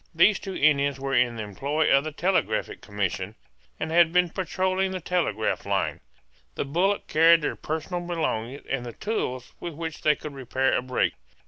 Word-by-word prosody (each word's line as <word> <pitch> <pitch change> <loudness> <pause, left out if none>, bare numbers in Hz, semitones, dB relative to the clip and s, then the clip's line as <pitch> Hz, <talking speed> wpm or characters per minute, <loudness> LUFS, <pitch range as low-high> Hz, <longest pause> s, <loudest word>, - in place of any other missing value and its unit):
These 195 +5 +5
two 195 -1 -6
Indians 140 -2 +3
were 135 0 -3
in 120 -2 +3
the 110 - -4
employ 140 +10 0
of 140 - +3
the 155 - -4
Telegraphic 155 - 0
Commission, 100 0 -3 0.4
and 160 - -3
had 170 -1 +5
been 180 -1 +3
patrolling 190 +1 0
the 185 0 -4
telegraph 165 - -1
line. - - -1 0.6
The - - -2
bullock 180 +8 +1
carried 165 +1 +5
their - - -1
personal 160 +3 -3
belongings 145 -7 -3
and 135 -3 -2
the 120 -1 -7
tools 130 - -3
with 170 -3 -6
which 160 -1 -5
they 150 -1 +4
could 150 0 -8
repair 135 0 0
a - - +1
break. 130 0 0
150 Hz, 180 wpm, -26 LUFS, 130-175 Hz, 0.6 s, These